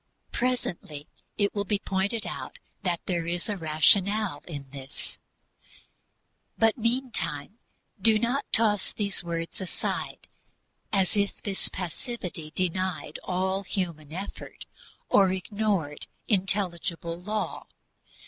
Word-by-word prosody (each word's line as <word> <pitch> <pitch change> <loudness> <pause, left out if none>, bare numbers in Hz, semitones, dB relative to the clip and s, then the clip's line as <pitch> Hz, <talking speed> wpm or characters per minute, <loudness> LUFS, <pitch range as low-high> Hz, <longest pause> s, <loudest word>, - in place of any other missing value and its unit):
Presently 175 - -1 0.3
it 205 -1 +2
will 205 - +1
be 205 +1 +2
pointed 195 +3 0
out - - -5 0.2
that 175 -3 +1
there 170 -3 0
is 175 +1 0
a 210 - 0
rationale 185 +2 +4
in 145 -5 -5
this; 135 -1 -6 1.4
but 225 -1 +5
meantime 230 - 0 0.4
do 220 +2 +6
not 245 +5 0
toss 210 -3 +4
these 200 -4 0
words 170 +1 -3
aside 185 - -3 0.6
as 195 -2 +3
if 200 -1 +1
this 195 -2 +1
passivity 180 - -4
denied 185 -3 0
all 190 +1 +1
human 170 -7 -2
effort 190 +5 -6 0.4
or 195 -2 +6
ignored 190 -5 0 0.2
intelligible 180 -4 0
law. 210 +3 -2
190 Hz, 110 wpm, -28 LUFS, 170-210 Hz, 1.4 s, do